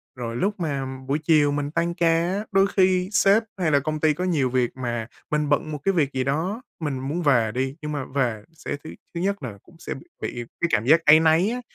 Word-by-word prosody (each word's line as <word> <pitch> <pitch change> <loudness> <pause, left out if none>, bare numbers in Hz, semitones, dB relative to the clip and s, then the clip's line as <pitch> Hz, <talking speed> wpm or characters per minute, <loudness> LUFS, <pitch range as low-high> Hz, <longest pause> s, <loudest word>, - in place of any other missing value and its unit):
rồi 115 -2 -5
lúc 200 - -1
mà 140 -5 -2 0.2
buổi 140 +3 0
chiều 150 -2 +4
mình 145 0 -2
tăng 170 +2 0
ca 170 -1 +2 0.3
á, 205 +2 -3
đôi 195 0 +4
khi 185 -2 +2
sếp 200 +2 +4 0.2
hay 170 -4 +1
là 145 - +4
công 155 +2 -3
ty 155 0 +3
có 180 - -4
nhiều 155 -8 +1
việc 125 0 0
mà 120 -3 -3 0.2
mình 150 -1 0
bận 150 +2 +1
một 150 - -3
cái 195 - +2
việc 145 -6 +1
gì 130 -1 0
đó, 165 - -1 0.2
mình 145 -5 -3
muốn 145 +7 -3
về 120 -8 +3
đi, 130 +3 -2
nhưng 150 0 -4
mà 145 -3 -3
về 120 -6 0
sẽ 155 - -5
thứ 155 - -8 0.2
thứ 170 - -3
nhất 200 -3 -1
là 115 -6 -6
cũng 175 - -20
sẽ - - -5
b - - -9 0.2
bị 120 - -4 0.2
cái 170 - +3
cảm 105 - +2
giác 160 +5 +4
áy 150 +1 +8
náy 165 +4 +3
á, 250 +2 -3
150 Hz, 250 wpm, -24 LUFS, 135-175 Hz, 0.3 s, áy